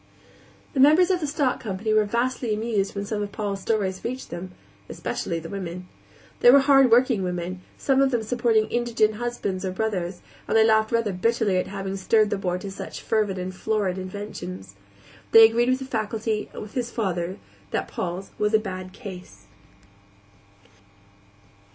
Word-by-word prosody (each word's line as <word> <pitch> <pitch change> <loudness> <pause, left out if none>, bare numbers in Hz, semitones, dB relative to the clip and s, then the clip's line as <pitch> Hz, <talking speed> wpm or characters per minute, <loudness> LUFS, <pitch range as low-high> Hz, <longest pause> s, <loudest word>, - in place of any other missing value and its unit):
The 275 - -2
members 310 +7 +6
of 365 - +1
the 305 - -2
stock 280 -3 0
company 215 +1 -2
were 215 -1 +4
vastly 235 +1 -1
amused 215 -3 -1
when 200 0 -3
some 210 0 -3
of 205 -1 -4
Paul's 200 -2 -3
stories 190 -3 -1
reached 255 +2 -5
them 185 +2 -6 0.4
especially 170 - -3
the 165 0 -6
women. 180 -1 -6 0.5
They 245 - +7
were 275 +2 +8
hardworking 255 -4 +5
women, 180 0 -3 0.2
most - - -15
of 275 - +4
them 240 -4 0
supporting 230 -1 +2
indigent 225 -3 +1
husbands 220 -6 -3
or 190 - -1
brothers, 185 -3 -2 0.3
and - - +2
they 220 - +6
laughed 220 0 +3
rather 230 -4 +1
bitterly 215 0 +1
at 185 - 0
having 195 0 -4
stirred 215 +2 +3
the - - 0
boy 180 -2 -1
to 195 +1 -7
such - - -8
fervid 210 -4 0
and 185 0 -4
florid 195 -1 -1
inventions. 100 - -7 0.6
They 225 0 +10
agreed 235 +2 +1
with 255 - +3
the 265 - -7
faculty 220 -2 -2
and - - -7
with 210 - -11
his 245 -2 -2
father 185 -5 -2 0.3
that - - -2
Paul's 180 +2 -5
was 210 +1 +2
a - - +5
bad 185 -3 -6
case. 180 - -10
210 Hz, 170 wpm, -24 LUFS, 185-235 Hz, 0.6 s, They